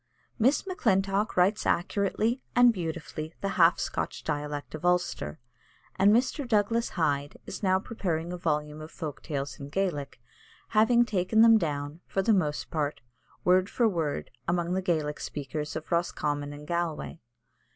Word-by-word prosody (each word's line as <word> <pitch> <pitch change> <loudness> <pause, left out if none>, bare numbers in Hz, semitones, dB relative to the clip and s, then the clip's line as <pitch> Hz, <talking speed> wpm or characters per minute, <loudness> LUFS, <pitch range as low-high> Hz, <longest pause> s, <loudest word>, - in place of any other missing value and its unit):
Miss 260 - +3
Maclintock 200 - +1
writes 195 +4 +3
accurately 205 +7 0
and 245 -1 +7
beautifully 160 -3 -5
the 195 - -1
half 170 -2 +5
Scotch - - -3
dialect 145 -1 -3
of 155 +1 -7
Ulster; 175 - 0 0.6
and 200 +2 +5
Mr. 255 +4 +1
Douglas 230 +1 +2
Hyde 145 -3 0
is 190 - -7
now 190 -2 +3
preparing 175 -5 -3
a - - -4
volume 150 -3 -2
of 155 - -8
folk 150 -4 -6
tales 140 -3 -4
in 140 0 -7
Gaelic, 145 -7 -2 0.5
having 235 +2 +4
taken 215 0 +2
them 225 -1 +7
down, 145 -2 -3
for 195 - 0
the 220 - +4
most 150 -7 0
part, 150 -5 -2 0.4
word 185 +2 +4
for 235 - +2
word 155 - -2 0.2
among 175 0 0
the 190 - 0
Gaelic 155 -5 -1
speakers 150 +1 -5
of 160 - -6
Roscommon 145 -4 -1
and 145 0 -9
Galway. 170 -1 -2
175 Hz, 150 wpm, -28 LUFS, 150-200 Hz, 0.6 s, and